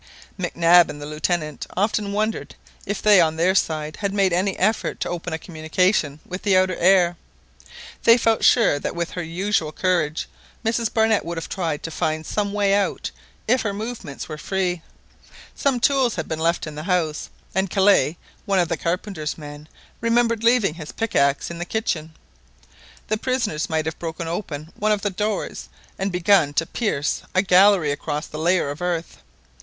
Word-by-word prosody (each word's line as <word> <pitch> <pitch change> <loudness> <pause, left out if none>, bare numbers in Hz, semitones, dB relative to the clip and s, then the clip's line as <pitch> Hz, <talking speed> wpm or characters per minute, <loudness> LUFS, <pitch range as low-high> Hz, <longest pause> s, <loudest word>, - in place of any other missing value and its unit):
Mac 180 -3 -4
Nab 170 0 +6
and 145 - -7
the 145 - -7
Lieutenant 150 0 -2
often 205 0 0
wondered 215 +2 -2 0.3
if 205 +1 -3
they 205 -3 +7
on 160 -1 +2
their 175 +3 +2
side 155 -4 -1
had 200 -1 -2
made 195 -3 +2
any 190 +2 0
effort 215 +4 0
to - - -2
open 175 0 -4
a 160 - -1
communication 160 -1 0
with 185 +1 -6
the 195 -3 +3
outer 185 -1 +2
air. 175 -1 +4 0.8
They 230 +1 +6
felt 225 -2 +1
sure 225 - +5
that - - -4
with 170 0 -3
her 180 - -4
usual 170 0 -1
courage, 165 -3 0 0.4
Mrs 230 0 0
Barnett 220 -1 +2
would 170 +1 -5
have 165 - -5
tried 165 -5 -2
to 165 - -5
find 155 -1 -2
some 205 +3 -1
way 200 -1 +2
out 200 0 0 0.4
if 250 +3 +3
her 205 -2 -2
movements 210 - -6
were 155 -1 -7
free. 180 -2 -1 0.7
Some 270 -3 0
tools 265 -2 +2
had 160 -3 -4
been 160 - -3
left 170 +1 +1
in 155 - -7
the 150 +2 -7
house, 165 -4 0 0.2
and 190 +1 0
Kellet, 190 -6 +3 0.3
one 200 -1 +2
of 175 -3 +2
the 165 - -1
carpenter's 170 -3 -3
men, 150 0 -10 0.3
remembered 230 -1 +1
leaving 230 -7 +3
his 155 -2 -8
pickaxe 140 -11 0
in 170 - -7
the - - -2
kitchen. 165 -6 -3 0.9
The 215 - 0
prisoners 215 -11 -1
might 160 -1 0
have 160 0 -4
broken 165 0 -5
open 165 -3 -5
one 215 +1 0
of 210 -1 +1
the 205 - 0
doors 210 +2 -3 0.3
and 195 +1 -1
begun 180 -4 +3
to 165 - +2
pierce 160 -9 -1
a 185 - +4
gallery 185 -4 +5
across 150 +1 -3
the 155 - -8
layer 170 -3 +2
of 145 - -8
earth. 175 -2 -2
180 Hz, 180 wpm, -22 LUFS, 160-205 Hz, 0.9 s, they